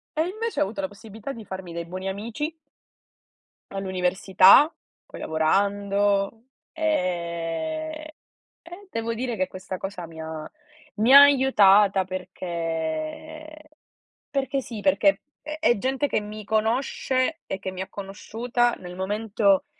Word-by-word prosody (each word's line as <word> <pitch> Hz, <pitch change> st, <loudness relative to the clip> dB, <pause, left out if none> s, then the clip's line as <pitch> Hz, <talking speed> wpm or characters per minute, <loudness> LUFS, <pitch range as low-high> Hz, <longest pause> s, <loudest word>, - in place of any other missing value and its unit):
E 315 Hz, +2 st, +1 dB
invece 440 Hz, +5 st, -3 dB
ho -, -, +5 dB
avuto 195 Hz, +1 st, -5 dB
la 190 Hz, -, -2 dB
possibilità 220 Hz, +5 st, -9 dB
di 225 Hz, -3 st, -10 dB
farmi 185 Hz, -3 st, -7 dB
dei 170 Hz, 0 st, -4 dB
buoni 185 Hz, +2 st, -5 dB
amici 230 Hz, +10 st, -4 dB, 1.2 s
all'università, 190 Hz, -, +4 dB, 0.3 s
poi -, -, -11 dB
lavorando; 200 Hz, +5 st, +1 dB, 0.3 s
e 310 Hz, -, -2 dB, 0.5 s
e 350 Hz, +4 st, -12 dB
devo 230 Hz, 0 st, -2 dB
dire 240 Hz, 0 st, -3 dB
che 185 Hz, -2 st, 0 dB
questa 185 Hz, 0 st, -7 dB
cosa 190 Hz, -3 st, -6 dB
mi 160 Hz, 0 st, -11 dB
ha 160 Hz, -1 st, -6 dB, 0.5 s
mi 225 Hz, +5 st, +3 dB
ha 280 Hz, -, +13 dB
aiutata 210 Hz, -9 st, +5 dB
perché 180 Hz, -, -5 dB, 0.6 s
perché 275 Hz, -1 st, -1 dB
sì, 225 Hz, -5 st, -7 dB
perché 295 Hz, +3 st, +3 dB, 0.2 s
è 305 Hz, +1 st, -6 dB
è 275 Hz, -8 st, +3 dB
gente 265 Hz, +6 st, 0 dB
che -, -, 0 dB
mi 210 Hz, +1 st, -8 dB
conosce 255 Hz, +7 st, 0 dB
e 190 Hz, -, -4 dB
che 190 Hz, 0 st, -4 dB
mi 185 Hz, 0 st, -6 dB
ha 190 Hz, -, -4 dB
conosciuta 230 Hz, +5 st, -1 dB
nel 180 Hz, -1 st, -9 dB
momento 200 Hz, 0 st, +1 dB
205 Hz, 130 wpm, -25 LUFS, 185-270 Hz, 1.2 s, ha